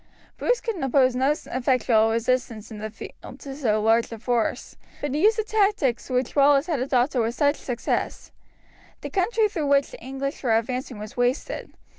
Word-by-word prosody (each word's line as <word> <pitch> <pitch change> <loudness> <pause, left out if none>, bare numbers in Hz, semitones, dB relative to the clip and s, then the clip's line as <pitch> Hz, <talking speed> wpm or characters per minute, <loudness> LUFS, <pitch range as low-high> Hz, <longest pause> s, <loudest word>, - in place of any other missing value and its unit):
Bruce - - 0
could 455 -3 -3
oppose 260 -1 +3
no 260 +2 +2
effectual 250 -6 +1
resistance 230 -1 -1
in 215 - -7
the 215 +1 -4
field 220 - -11
to 275 -1 -8
so 225 -7 +1
large 225 +2 +2
a 230 - -6
force, 235 0 -1 0.2
but 290 -2 -3
he 300 - 0
used 430 +3 +4
the 440 - +1
tactics 400 - +1
which 255 -1 -1
Wallace 280 0 +5
had 325 -6 -1
adopted 255 0 +1
with 230 +1 -1
such 285 +2 +2
success. 245 -2 -3 0.7
The - - -6
country 425 +3 +2
through 325 -8 -3
which 280 0 +3
the - - -11
English 270 +2 -4
were 230 -4 +3
advancing 250 +1 -3
was 210 0 -8
wasted. 245 +2 -1
255 Hz, 180 wpm, -24 LUFS, 235-290 Hz, 0.7 s, Wallace